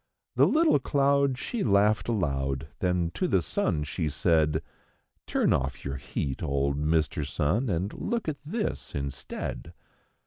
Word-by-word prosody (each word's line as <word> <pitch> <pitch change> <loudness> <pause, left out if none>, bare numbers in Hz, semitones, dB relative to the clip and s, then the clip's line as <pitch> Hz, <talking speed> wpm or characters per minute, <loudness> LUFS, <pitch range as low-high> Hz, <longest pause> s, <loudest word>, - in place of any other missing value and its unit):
The - - +6
little 320 +1 +4
cloud 140 -2 +2
she 230 - -3
laughed 105 0 +3
aloud; 70 - -1
then 90 -2 +1
to 185 - 0
the - - +3
sun 85 - 0
she 75 +2 -2
said: 80 0 +2 0.6
'Turn - - +2
off 65 0 -2
your 70 0 -3
heat, 65 0 -4
old 70 0 0
Mr. 75 +1 +1
Sun, 90 - 0
and 95 +3 -1
look 235 -4 -2
at 155 -2 -1
this 210 +9 -3
instead." 70 -1 -5
85 Hz, 140 wpm, -28 LUFS, -, 0.6 s, The